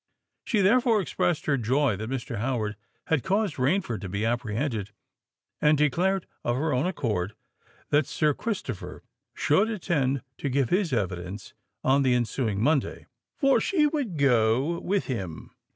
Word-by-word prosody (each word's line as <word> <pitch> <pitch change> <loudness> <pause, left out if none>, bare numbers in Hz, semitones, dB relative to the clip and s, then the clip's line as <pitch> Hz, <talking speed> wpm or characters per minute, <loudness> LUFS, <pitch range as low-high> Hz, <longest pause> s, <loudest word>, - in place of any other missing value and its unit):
She 215 -5 +1
therefore 230 +2 +4
expressed 175 -3 -1
her 140 -2 +2
joy 130 +1 +1
that 110 +3 -5
Mr. 120 -4 -4
Howard 110 -3 -1 0.3
had 160 -5 +1
caused 195 - 0
Rainford 135 - 0
to 100 - -5
be 100 +4 -2
apprehended, 115 -1 -1 0.7
and 150 0 +4
declared, 175 +6 +1 0.2
of 120 - 0
her 150 +2 0
own 130 +7 +1
accord, 110 - -2 0.6
that 145 -1 +3
Sir 150 -2 +1
Christopher 140 - -5 0.3
should 195 +10 +2
attend 145 - 0 0.2
to 140 - -2
give 135 -1 0
his 185 -1 +2
evidence 95 -3 -3 0.3
on 135 +2 +4
the 130 -2 +3
ensuing 115 -3 -1
Monday—"for 160 - 0
she 325 -6 +2
would 285 - -1
go 130 +4 +2
with 200 +1 -1
him!" 95 -11 -5
140 Hz, 145 wpm, -27 LUFS, 115-175 Hz, 0.7 s, therefore